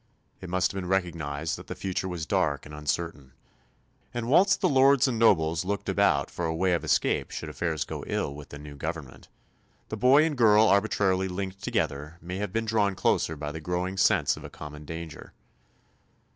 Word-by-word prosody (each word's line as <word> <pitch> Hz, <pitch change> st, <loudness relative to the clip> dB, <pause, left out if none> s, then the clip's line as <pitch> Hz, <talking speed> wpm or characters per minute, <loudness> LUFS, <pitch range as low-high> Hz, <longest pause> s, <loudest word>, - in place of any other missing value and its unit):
It 90 Hz, -, -8 dB
must 95 Hz, +1 st, +1 dB
have 95 Hz, -, -4 dB
been 90 Hz, -, -6 dB
recognised 80 Hz, -5 st, -2 dB
that -, -, -12 dB
the -, -, -5 dB
future 95 Hz, 0 st, -3 dB
was 85 Hz, -3 st, -4 dB
dark 85 Hz, -7 st, 0 dB
and 75 Hz, -, -11 dB
uncertain; 75 Hz, -2 st, -4 dB, 0.8 s
and 120 Hz, -1 st, -2 dB
whilst 190 Hz, +9 st, +4 dB
the -, -, +2 dB
lords 135 Hz, 0 st, +5 dB
and 120 Hz, -3 st, -1 dB
nobles 80 Hz, -7 st, +3 dB
looked 100 Hz, +2 st, -3 dB
about 70 Hz, -1 st, +2 dB
for 85 Hz, -, -3 dB
a 80 Hz, -, -2 dB
way 95 Hz, +2 st, +1 dB
of 85 Hz, -, 0 dB
escape -, -, +1 dB
should -, -, -6 dB
affairs 80 Hz, -3 st, -2 dB
go -, -, -6 dB
ill 70 Hz, -, -2 dB
with 75 Hz, 0 st, -11 dB
the 75 Hz, -, -9 dB
new 75 Hz, 0 st, -10 dB
government, 80 Hz, -2 st, -6 dB, 0.6 s
the 110 Hz, -, -4 dB
boy 130 Hz, +7 st, +5 dB
and 160 Hz, -2 st, -1 dB
girl 110 Hz, -1 st, +6 dB
arbitrarily 100 Hz, -2 st, +2 dB
linked 95 Hz, +1 st, -5 dB
together 75 Hz, +4 st, -2 dB
may 90 Hz, +3 st, -6 dB
have 100 Hz, -1 st, -3 dB
been 115 Hz, +3 st, -1 dB
drawn 105 Hz, -3 st, +1 dB
closer 80 Hz, -, +1 dB
by 75 Hz, 0 st, -5 dB
the 80 Hz, +1 st, -7 dB
growing 90 Hz, +3 st, -2 dB
sense 95 Hz, -, +3 dB
of -, -, -11 dB
a -, -, -8 dB
common 75 Hz, 0 st, -10 dB
danger. 80 Hz, +1 st, -8 dB
90 Hz, 195 wpm, -27 LUFS, 80-100 Hz, 0.8 s, girl